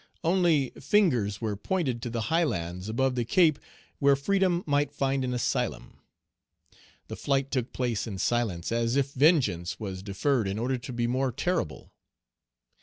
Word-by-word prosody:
Only 165 -6 +2
fingers 125 - +2
were 110 -2 -1
pointed 130 - -2
to 120 - -4
the 115 0 -3
high 165 +9 +1
lands 90 - -3
above 130 +4 +1
the 125 -1 0
Cape 160 - +3 0.4
where 140 -1 +5
freedom 185 +4 +1
might 145 -1 +1
find 135 -1 0
an 125 - -2
asylum. 125 -1 -2 1.1
The - - -6
flight 140 -1 -1
took 125 -3 -1
place 120 -4 -2
in 100 -4 -5
silence, 110 -6 -1
as 115 +1 0
if 140 0 +1
vengeance 125 - +2
was 95 -4 -5
deferred 105 +4 0
in 95 +1 -2
order 125 +3 -1
to 120 - -8
be 120 -1 -1
more 130 +2 0
terrible. 175 +9 -2
125 Hz, 160 wpm, -28 LUFS, 110-145 Hz, 1.1 s, where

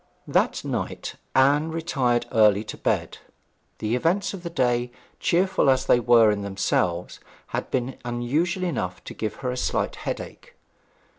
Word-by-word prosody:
That - - +1
night - - -3 0.2
Anne 145 +4 +4
retired 140 -7 0
early 105 -2 +4
to 110 - -7
bed. - - -1 0.6
The 110 +2 -1
events 180 +11 +1
of 195 - -7
the 170 - -5
day, 125 -6 0 0.3
cheerful 185 -3 +2
as 130 0 +3
they 125 - +5
were 115 -2 +5
in 105 -1 -2
themselves, 95 -3 -1 0.3
had - - -3
been 130 0 -2
unusual 135 +10 -1
enough 110 - -3
to - - -8
give 110 -2 -4
her 125 - +1
a 125 - -4
slight - - -1
headache. - - -6
125 Hz, 150 wpm, -25 LUFS, 110-160 Hz, 0.6 s, they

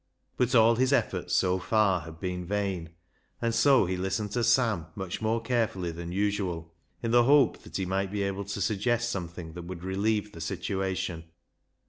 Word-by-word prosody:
But 125 0 +1
all 115 0 +6
his 130 +1 +2
efforts 140 - +1
so 95 0 +2
far 100 -3 +2
had 80 +1 -11
been 90 -1 -3
vain, 95 -3 -2 0.5
and 115 -1 0
so 135 -3 +5
he 95 +1 -1
listened 95 +3 -2
to 120 - 0
Sam 115 -8 +2
much 95 -1 -5
more 110 +1 +1
carefully 115 -7 -1
than 85 +1 -6
usual, 95 -4 -1 0.3
in 115 - 0
the 120 0 +5
hope 145 +1 +4
that - - -6
he 95 - -1
might 95 +1 -1
be 100 -1 -1
able 100 0 -2
to 100 0 -4
suggest 120 +4 +1
something 85 -4 -6
that 85 0 -8
would 90 -1 -7
relieve 105 +3 0
the 85 - -10
situation. 95 -4 -3
100 Hz, 180 wpm, -28 LUFS, 90-115 Hz, 0.5 s, all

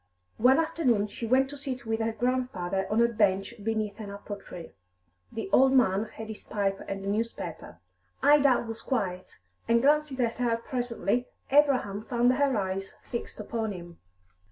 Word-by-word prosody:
One 255 +5 +6
afternoon 260 -11 +1
she 230 - -5
went 260 +3 +4
to 285 - -7
sit 260 -3 -5
with 225 0 -1
her 225 0 0
grandfather 220 -6 -1
on 225 +2 +3
a - - +5
bench 205 -2 +1
beneath 215 -1 -2
an 210 -2 -6
apple 200 +1 -7
tree. 175 -4 -10 0.6
The 225 - -4
old 265 +1 +6
man 215 -5 +3
had 220 0 -9
his 220 -1 -8
pipe 200 -2 -1
and 195 0 -4
a - - -4
newspaper. 200 - -3 0.5
Ida 280 -4 +5
was 225 0 -6
quiet, 190 -8 -3 0.3
and 235 0 +4
glancing 290 +1 +2
at 235 0 -1
her 235 -2 +1
presently, 245 0 -2 0.2
Abraham 265 -8 +3
found 245 0 +3
her 275 -2 +2
eyes 195 0 -3 0.2
fixed 235 - -5
upon 220 0 -3
him. 175 -2 -10
225 Hz, 165 wpm, -28 LUFS, 200-255 Hz, 0.6 s, One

